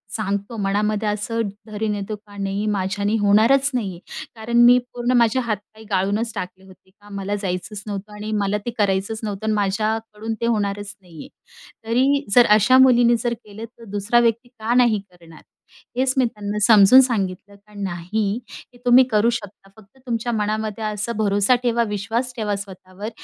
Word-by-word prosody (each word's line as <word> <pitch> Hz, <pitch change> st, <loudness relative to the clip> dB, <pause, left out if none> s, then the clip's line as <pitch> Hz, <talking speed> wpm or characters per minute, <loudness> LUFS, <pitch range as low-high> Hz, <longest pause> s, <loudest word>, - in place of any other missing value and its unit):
सांगतो 200 Hz, +1 st, -3 dB
मनामध्ये, 210 Hz, +2 st, 0 dB
असं 215 Hz, +2 st, -2 dB, 0.3 s
धरी 215 Hz, +1 st, -3 dB
नेतो 205 Hz, 0 st, -3 dB
का 205 Hz, -1 st, -17 dB
नाही 195 Hz, +1 st, -2 dB
माझ्याने 200 Hz, +2 st, -1 dB
होणारच 230 Hz, +8 st, +4 dB
नाही 230 Hz, -6 st, -1 dB
आहे. 170 Hz, -, -11 dB, 0.4 s
कारण 230 Hz, +2 st, -2 dB
मी 245 Hz, +1 st, +7 dB, 0.2 s
पूर्ण 240 Hz, 0 st, -1 dB
माझे 235 Hz, +1 st, +3 dB
हातपाय 215 Hz, -2 st, -5 dB
गाळूनच 200 Hz, +4 st, 0 dB
टाकले 185 Hz, +1 st, -6 dB
होते 190 Hz, 0 st, -19 dB
का 205 Hz, +2 st, -20 dB
मला 200 Hz, +1 st, -3 dB
जायचंच 195 Hz, +2 st, -4 dB
नव्हतं. 205 Hz, +1 st, -6 dB
आणि 210 Hz, +1 st, -6 dB
मला 200 Hz, +1 st, 0 dB
ते 240 Hz, -, -2 dB
करायचंच 200 Hz, +1 st, 0 dB
नव्हतं 210 Hz, 0 st, -4 dB
आणि 220 Hz, -, +1 dB
माझ्याकडून 215 Hz, +2 st, -2 dB
ते -, -, 0 dB
होणारच 205 Hz, -2 st, -2 dB
नाही 170 Hz, -4 st, -15 dB
आहे. -, -, -10 dB, 0.6 s
तरी 275 Hz, +4 st, +2 dB
जर 245 Hz, -1 st, +8 dB
अशा 255 Hz, +5 st, +4 dB
मुलींनी 245 Hz, -2 st, +5 dB
जर 240 Hz, -1 st, 0 dB
केलं, 215 Hz, -1 st, -10 dB
तर 230 Hz, 0 st, -18 dB
दुसरा 205 Hz, +4 st, +2 dB
व्यक्ती 235 Hz, +1 st, 0 dB
का 230 Hz, -1 st, -3 dB
नाही 240 Hz, -4 st, +4 dB
करणार? 165 Hz, -2 st, -17 dB, 0.6 s
हेच 260 Hz, 0 st, +2 dB
मी 260 Hz, -, +4 dB
त्यांना 210 Hz, -3 st, -4 dB
समजून 220 Hz, +3 st, +8 dB
सांगितलं. 200 Hz, -5 st, -2 dB
का, 210 Hz, +1 st, -23 dB
नाही 200 Hz, +3 st, -2 dB, 0.3 s
ते -, -, -17 dB
तुम्ही 245 Hz, +2 st, +7 dB
करू 215 Hz, +2 st, +3 dB
शकता, 205 Hz, -4 st, -6 dB
फक्त 220 Hz, +5 st, -20 dB
तुमच्या 235 Hz, 0 st, -2 dB
मनामध्ये 215 Hz, 0 st, -2 dB
असा 210 Hz, +1 st, -3 dB
भरोसा 205 Hz, +3 st, +3 dB
ठेवा, 235 Hz, -1 st, +2 dB
विश्वास 225 Hz, +5 st, -2 dB
ठेवा, 210 Hz, -3 st, -2 dB
स्वतःवर 195 Hz, +1 st, -8 dB
210 Hz, 170 wpm, -21 LUFS, 200-235 Hz, 0.6 s, जर